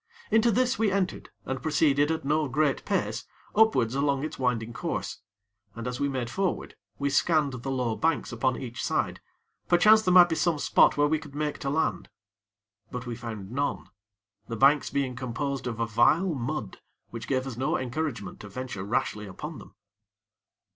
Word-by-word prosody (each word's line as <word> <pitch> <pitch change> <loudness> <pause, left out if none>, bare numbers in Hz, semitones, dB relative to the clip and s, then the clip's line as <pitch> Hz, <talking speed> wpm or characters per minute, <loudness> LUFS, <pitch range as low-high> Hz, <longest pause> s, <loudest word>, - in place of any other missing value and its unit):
Into 225 +1 +4
this 250 +2 +1
we 220 -3 +2
entered, 190 -2 -1 0.2
and 130 -1 -3
proceeded 145 -1 +2
at 160 -3 -2
no 150 +1 +1
great 140 +2 +1
pace - - -1 0.3
upwards 205 - +4
along 140 0 +1
its 155 - -5
winding 120 -3 -1
course; - - -4 0.6
and 115 0 -6
as 125 0 -4
we 140 - +1
made 130 -3 -2
forward, 185 +8 -2 0.2
we 140 0 -1
scanned 150 -1 +2
the 125 +2 -5
low 125 -4 -1
banks 160 0 0
upon 125 +2 0
each 120 -2 -6
side, - - -1 0.5
perchance 215 +5 +6
there 185 - +1
might 175 -1 +9
be - - 0
some 160 0 +1
spot 145 - +4
where 145 - +4
we 155 +1 +1
could 150 -2 -12
make 150 0 -2
to 140 - -2
land; 140 - -1 0.8
but 125 0 -6
we 120 -1 -4
found 110 -4 -7
none 140 -6 -2 0.6
the 115 - -4
banks 140 +5 +4
being 135 -3 -1
composed 130 +2 -3
of 115 -2 -4
a 115 - +1
vile 135 - +3
mud 125 -5 -4 0.3
which 115 0 -7
gave 130 -1 0
us 130 -3 -5
no 130 +3 0
encouragement 125 -5 -4
to 105 - -9
venture 115 -3 -5
rashly 105 0 -1
upon 95 - -7
them. - - -15
135 Hz, 180 wpm, -27 LUFS, 120-155 Hz, 0.8 s, might